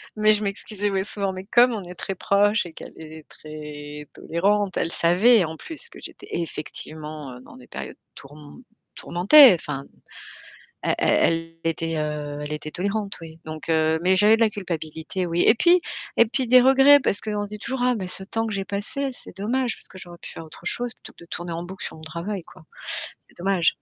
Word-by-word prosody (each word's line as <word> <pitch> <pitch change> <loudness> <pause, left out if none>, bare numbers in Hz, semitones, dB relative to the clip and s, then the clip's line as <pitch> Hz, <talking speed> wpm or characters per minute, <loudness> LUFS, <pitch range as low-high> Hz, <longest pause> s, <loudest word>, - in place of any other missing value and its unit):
Mais 215 0 +5
je 210 0 +2
m'excusais, 205 +1 -2
mais 190 0 0
souvent, 200 -2 -3
mais 185 0 -7
comme 240 +3 +5
on 210 - -4
est 180 0 -10
très 195 -2 -5
proche 205 +2 +2
et 170 - -8
qu'elle - - -10
est 160 -1 -10
très 150 -1 -9
tolérante, 200 +3 0
elle 165 - 0
savait, 195 +6 +5
en 160 0 -6
plus, 330 - -9
que - - -13
j'étais - - -10
effectivement 150 -4 -6
dans - - -14
des 125 - -15
périodes - - -7 0.2
tourm 145 - -13 0.3
tourmentées, 230 - +7
enfin, 140 -4 -5 1.0
elle - - +1
elle 165 0 +2
elle 165 - +2
était, 165 0 -3
heu, 150 -1 -3
elle 150 +1 -4
était 150 0 -5
tolérante, 200 +3 -2
oui. 160 0 -11
Donc, 155 +1 -7
heu, 160 0 +2
mais, 185 +1 +4
j'avais 210 +3 +6
de - - -3
la 225 - +5
culpabilité, 170 -3 -4
oui 170 0 0
et 220 - +6
puis, 345 +7 +5 0.4
et 230 - +7
puis, 265 -2 0
des 250 +1 +8
regrets 270 +2 +7
parce 200 - +1
qu'on 210 -1 -2
dit 210 +1 -8
toujours: 265 +3 -3
«Oh 250 - +3
mais 190 -3 -4
ce 190 - -7
temps 225 +4 -2
que 215 - -4
j'ai 195 -1 -2
passé, 275 +9 -3
c'est 245 - -10
dommage, 240 +3 -1
parce - - -16
que - - -13
j'aurais 175 -2 -11
pu - - -10
faire 165 - -9
autre 160 +2 -14
chose 240 +5 -2
plutôt - - -14
que - - -15
de - - -16
tourner 175 0 -5
en 170 +1 -4
boucle 185 +2 -8
sur - - -7
mon 160 - -13
travail, 170 +4 -4
quoi. - - -16 0.7
C'est - - -25
dommage». 180 -2 +2
185 Hz, 210 wpm, -24 LUFS, 160-215 Hz, 1.0 s, des